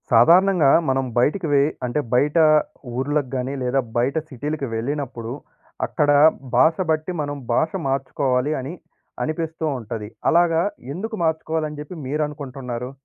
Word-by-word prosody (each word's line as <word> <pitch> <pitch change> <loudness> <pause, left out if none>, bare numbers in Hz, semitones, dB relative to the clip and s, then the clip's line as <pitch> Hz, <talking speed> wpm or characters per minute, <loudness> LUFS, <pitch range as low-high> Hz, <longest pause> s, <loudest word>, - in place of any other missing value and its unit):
సాధారణంగా 170 +6 +6 0.2
మనం 135 0 +1
బయటికి 160 +8 +2
వే 140 - +5 0.2
అంటే, 125 +4 -1
బయటా 150 +6 +4 0.5
ఊర్లకు 145 0 0
గానీ, 130 +1 -2
లేదా 125 +2 +1 0.2
బయట 125 +5 +1
సిటీలకి 145 +1 -4
వెళ్ళినప్పుడు, 120 -1 -3 0.5
అక్కడా 145 -1 +3 0.4
భాష 160 +6 +5 0.2
బట్టి 155 +3 -1
మనం 145 0 -4 0.2
భాష 155 +6 +2 0.2
మార్చుకోవాలి 135 +1 0
అని 135 +6 -6 0.5
అనిపిస్తూ 160 0 -3
ఉంటది. 110 -2 -6 0.2
అలాగా 165 -1 +4 0.3
ఎందుకు 220 +5 -4
మార్చుకోవాలి 160 -1 0
అని 150 -1 -9
చెప్పి 150 +5 -9
మీరు 150 +3 -1
అనుకుంటన్నారు? 130 -4 -6
145 Hz, 130 wpm, -22 LUFS, 130-160 Hz, 0.5 s, సాధారణంగా